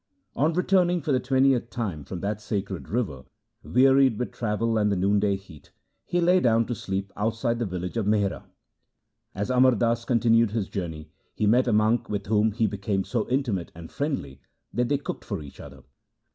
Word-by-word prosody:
On 155 Hz, +4 st, +2 dB
returning 180 Hz, 0 st, +2 dB
for 150 Hz, -, -1 dB
the 130 Hz, -, +3 dB
twentieth 130 Hz, -2 st, +2 dB
time 95 Hz, -, -4 dB
from 85 Hz, +5 st, -7 dB
that 105 Hz, +1 st, -3 dB
sacred 100 Hz, -3 st, -4 dB
river, 95 Hz, -, -2 dB, 0.4 s
wearied 135 Hz, -1 st, +4 dB
with 125 Hz, -, -3 dB
travel 115 Hz, 0 st, -1 dB
and 105 Hz, -1 st, +2 dB
the -, -, +1 dB
noonday 100 Hz, +2 st, +2 dB
heat, 95 Hz, -7 st, -13 dB, 0.4 s
he 175 Hz, -, 0 dB
lay 180 Hz, +2 st, +4 dB
down 115 Hz, -5 st, +3 dB
to 120 Hz, -, -3 dB
sleep 95 Hz, -2 st, -4 dB
outside 115 Hz, +2 st, -1 dB
the 120 Hz, -, -1 dB
village 90 Hz, +3 st, -4 dB
of 110 Hz, -3 st, -1 dB
Mihra. 105 Hz, -1 st, 0 dB, 0.9 s
As 100 Hz, +6 st, -2 dB
Amar 130 Hz, 0 st, +5 dB
Das 115 Hz, +1 st, 0 dB
continued 115 Hz, -2 st, +3 dB
his 110 Hz, -4 st, -2 dB
journey, 80 Hz, -6 st, -5 dB, 0.2 s
he 105 Hz, -, 0 dB
met 125 Hz, +5 st, +3 dB
a -, -, +2 dB
monk 110 Hz, +2 st, +2 dB
with 100 Hz, -1 st, -3 dB
whom 110 Hz, +1 st, +2 dB
he 110 Hz, +2 st, 0 dB
became 100 Hz, -1 st, -1 dB
so 115 Hz, +1 st, -2 dB
intimate 120 Hz, -9 st, -1 dB
and 85 Hz, 0 st, -10 dB
friendly 100 Hz, -, -3 dB, 0.3 s
that 120 Hz, 0 st, 0 dB
they 145 Hz, -, +2 dB
cooked 145 Hz, -, -6 dB
for -, -, -4 dB
each 70 Hz, -, -13 dB
other. -, -, -12 dB
110 Hz, 185 wpm, -26 LUFS, 100-125 Hz, 0.9 s, Amar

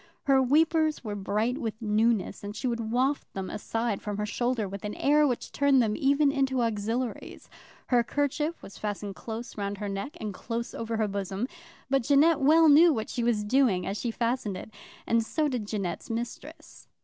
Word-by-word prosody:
Her 270 Hz, -1 st, +4 dB
weepers 310 Hz, +3 st, +2 dB
were 215 Hz, -3 st, -4 dB
bright 215 Hz, +6 st, -1 dB
with 220 Hz, -4 st, -4 dB
newness, 220 Hz, -2 st, +1 dB
and 205 Hz, +1 st, -6 dB
she -, -, -5 dB
would 230 Hz, -3 st, -2 dB
waft 265 Hz, +4 st, 0 dB
them 190 Hz, -1 st, -4 dB
aside 225 Hz, 0 st, -2 dB
from 205 Hz, -1 st, -4 dB
her 210 Hz, -, -1 dB
shoulder 240 Hz, 0 st, -1 dB
with 195 Hz, +1 st, -7 dB
an 210 Hz, 0 st, -4 dB
air 295 Hz, +1 st, +4 dB
which 250 Hz, -3 st, -3 dB
turned 280 Hz, -1 st, +3 dB, 0.2 s
even 285 Hz, 0 st, +3 dB
them 280 Hz, -, -2 dB
into 265 Hz, -2 st, +1 dB
auxiliaries. 230 Hz, +2 st, -3 dB, 0.4 s
Her 245 Hz, -2 st, +4 dB
kerchief 290 Hz, +5 st, -1 dB
was 195 Hz, -, -11 dB
fastened 205 Hz, -1 st, -4 dB
close 225 Hz, +3 st, -7 dB
round 200 Hz, 0 st, -3 dB
her 205 Hz, 0 st, -4 dB
neck 235 Hz, -, -5 dB
and 210 Hz, -2 st, -4 dB
close 230 Hz, +4 st, -4 dB
over 225 Hz, 0 st, -3 dB
her 215 Hz, -1 st, +1 dB
bosom; 200 Hz, +3 st, -3 dB, 0.4 s
but 270 Hz, 0 st, +2 dB
Jeannette 290 Hz, +5 st, +4 dB
well 315 Hz, +4 st, +6 dB
knew 320 Hz, +3 st, +7 dB
what 220 Hz, -6 st, -3 dB
she 240 Hz, -, -2 dB
was 230 Hz, -3 st, +1 dB
doing 210 Hz, -5 st, +2 dB
as 195 Hz, -, -2 dB
she 235 Hz, -, -2 dB
fastened 230 Hz, -4 st, -1 dB
it, 220 Hz, -, -9 dB, 0.3 s
and 230 Hz, 0 st, +2 dB
so 305 Hz, +6 st, 0 dB
did 245 Hz, -7 st, -3 dB
Jeannette's 195 Hz, -5 st, -4 dB
mistress. 275 Hz, +8 st, -7 dB
235 Hz, 190 wpm, -28 LUFS, 210-275 Hz, 0.4 s, knew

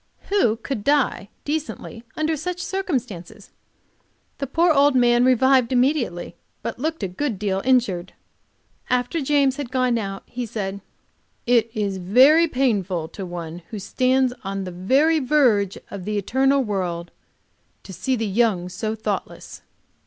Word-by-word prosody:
Who 385 Hz, -, +3 dB
could 230 Hz, -1 st, -5 dB
die 280 Hz, -7 st, +1 dB, 0.2 s
decently 295 Hz, -6 st, -4 dB
under 310 Hz, +1 st, 0 dB
such 360 Hz, +4 st, -4 dB
circumstances? 245 Hz, -, -4 dB, 0.9 s
The 275 Hz, -, -2 dB
poor 330 Hz, +5 st, +3 dB
old 285 Hz, -1 st, +4 dB
man 240 Hz, -1 st, +4 dB
revived 260 Hz, -1 st, +4 dB
immediately, 250 Hz, -, 0 dB, 0.3 s
but -, -, -4 dB
looked 315 Hz, +1 st, -2 dB
a -, -, 0 dB
good 215 Hz, +5 st, -3 dB
deal 195 Hz, -1 st, -1 dB
injured. 225 Hz, -9 st, +1 dB, 0.8 s
After 250 Hz, +6 st, 0 dB
James 275 Hz, -1 st, +2 dB
had 285 Hz, -4 st, -4 dB
gone 255 Hz, -2 st, +1 dB
out, 195 Hz, -2 st, -5 dB
he 245 Hz, -1 st, -5 dB
said: 200 Hz, -3 st, -4 dB, 0.6 s
"It 235 Hz, -2 st, +3 dB
is 200 Hz, -3 st, -1 dB
very 260 Hz, -, +5 dB
painful 200 Hz, -, 0 dB
to 195 Hz, -2 st, -7 dB
one 170 Hz, -1 st, -7 dB
who 220 Hz, -, -6 dB
stands 255 Hz, +5 st, +1 dB
on 195 Hz, 0 st, -3 dB
the 185 Hz, -, -6 dB
very 270 Hz, -, +2 dB
verge 250 Hz, -9 st, +2 dB
of 190 Hz, -3 st, -7 dB
the 210 Hz, 0 st, -2 dB
eternal 265 Hz, +7 st, +2 dB
world 180 Hz, -5 st, -3 dB, 0.7 s
to 190 Hz, -, -10 dB
see 220 Hz, +9 st, -1 dB
the 225 Hz, -2 st, -2 dB
young 200 Hz, -4 st, +1 dB
so 215 Hz, +4 st, -3 dB
thoughtless." 215 Hz, -2 st, -5 dB
240 Hz, 145 wpm, -22 LUFS, 195-275 Hz, 0.9 s, very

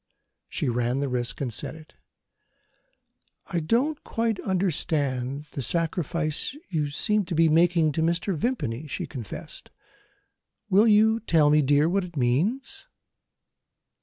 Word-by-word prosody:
She -, -, -2 dB
ran 120 Hz, +1 st, 0 dB
the 140 Hz, -, -1 dB
risk 125 Hz, 0 st, -3 dB
and 125 Hz, -4 st, -2 dB
said -, -, -4 dB
it. 160 Hz, -1 st, -15 dB, 1.5 s
"I 175 Hz, -, -2 dB
don't 245 Hz, -, 0 dB
quite 225 Hz, -3 st, -1 dB
understand 145 Hz, -8 st, -1 dB
the 140 Hz, -, -4 dB
sacrifice 165 Hz, -, -1 dB
you 150 Hz, -5 st, -1 dB
seem 210 Hz, +8 st, +1 dB
to 175 Hz, -, -4 dB
be 165 Hz, 0 st, +4 dB
making 165 Hz, 0 st, +3 dB
to 160 Hz, -, -2 dB
Mr. 170 Hz, +3 st, 0 dB
Vimpany," 155 Hz, -, -2 dB
she -, -, -4 dB
confessed. 120 Hz, -8 st, -8 dB, 1.0 s
"Will 205 Hz, +4 st, +5 dB
you 220 Hz, +1 st, +4 dB
tell 160 Hz, -8 st, +3 dB
me, 150 Hz, 0 st, +5 dB
dear, 145 Hz, +2 st, +3 dB
what 195 Hz, +3 st, +1 dB
it 175 Hz, -3 st, -9 dB
means?" 220 Hz, -, -1 dB
160 Hz, 135 wpm, -26 LUFS, 140-195 Hz, 1.5 s, Will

